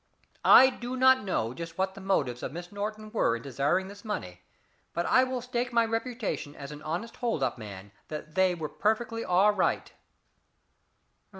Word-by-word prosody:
I 260 0 +8
do 250 0 -5
not 260 0 +6
know 120 - -1
just 165 +3 -7
what 190 0 0
the 195 - -11
motives 140 -11 0
of - - -4
Miss 175 +3 -8
Norton 215 +1 -5
were 210 - +2
in 115 - -7
desiring 140 +8 0
this 200 +1 -11
money, 90 - -5 0.5
but 170 - -1
I 255 - +5
will 255 -1 -2
stake 250 0 -2
my 230 -1 +3
reputation 225 - -3
as 140 0 -8
an 150 0 -9
honest 175 +10 -4
hold 230 - -1
up 125 -2 -1
man 100 -2 -9 0.2
that 155 0 -7
they 185 0 +3
were 160 -3 -4
perfectly 220 +7 -1
all 190 +4 +4
right." 205 - 0
190 Hz, 180 wpm, -29 LUFS, 150-230 Hz, 0.5 s, I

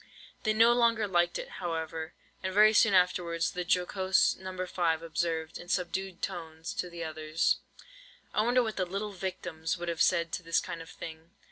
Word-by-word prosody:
They 215 - +1
no 230 +2 +6
longer 230 -3 +3
liked 175 -2 +2
it, - - -5
however; 160 -1 -3 0.3
and 190 - -2
very 215 +2 +6
soon 210 -2 +5
afterwards 175 -2 +2
the 180 - -3
jocose 185 +2 +2
No. 185 -1 -5
5 165 -3 0
observed, 160 -1 -2
in 175 - -11
subdued 185 0 -2
tones 165 -3 -5
to 180 - -3
the 170 -1 -6
others:— 155 0 0 0.8
"I - - +3
wonder 245 +3 +3
what 220 -2 -4
the 185 - +1
little 200 +3 -3
victims 180 -4 -4
would 175 0 -4
have 165 0 -2
said 170 -2 +3
to - - -3
this 165 -1 +1
kind 165 - -6
of 165 - -11
thing?" 160 0 -9
175 Hz, 180 wpm, -30 LUFS, 165-190 Hz, 0.8 s, no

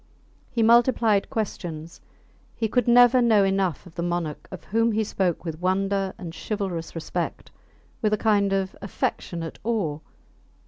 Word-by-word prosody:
He 235 -3 0
multiplied 230 -3 +4
questions; 170 -6 -5 0.5
he 225 - -1
could 245 +2 +1
never 245 +1 +6
know 220 -4 +4
enough 195 -4 0
of 175 - -14
the 170 - -4
Monarch 170 -3 -3
of 185 - -9
whom 230 +2 +1
he 220 +1 +1
spoke 185 -4 -1
with 160 0 -5
wonder 195 +1 0
and 170 -2 -7
chivalrous 190 -7 -4
respect 165 +1 -4 0.5
with 215 - +1
a 215 - +2
kind 205 -2 +2
of 195 -1 -1
affectionate 170 -4 -4
awe! 195 -10 -1
195 Hz, 145 wpm, -25 LUFS, 175-220 Hz, 0.5 s, never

